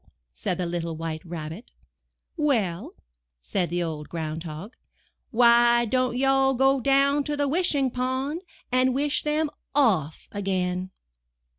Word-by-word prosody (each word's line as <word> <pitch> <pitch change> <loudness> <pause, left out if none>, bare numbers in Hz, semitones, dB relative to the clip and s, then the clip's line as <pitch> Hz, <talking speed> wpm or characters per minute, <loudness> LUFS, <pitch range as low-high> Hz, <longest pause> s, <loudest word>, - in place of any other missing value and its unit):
said 120 - -3
the 180 - -1
little 170 -1 -3
White 160 -1 -5
Rabbit. 165 +4 -7 0.6
"Well," 230 - 0 0.4
said 170 - -2
the 175 0 -1
Old 155 -3 -5
Ground 160 0 -4
Hog, 165 +9 -8 0.6
'Vhy 235 0 +5
don't 255 -1 +1
you 270 - +1
all 270 0 +3
go 270 +2 +3
down 275 +2 +3
to 295 -1 -2
the 285 0 +1
Wishing 285 -4 +1
Pond 260 +6 -2 0.3
and 255 0 +3
wish 290 +2 +1
them 300 0 0 0.2
o// 195 - +3 0.2
again?" 185 -2 -2
240 Hz, 135 wpm, -25 LUFS, 170-270 Hz, 0.6 s, Vhy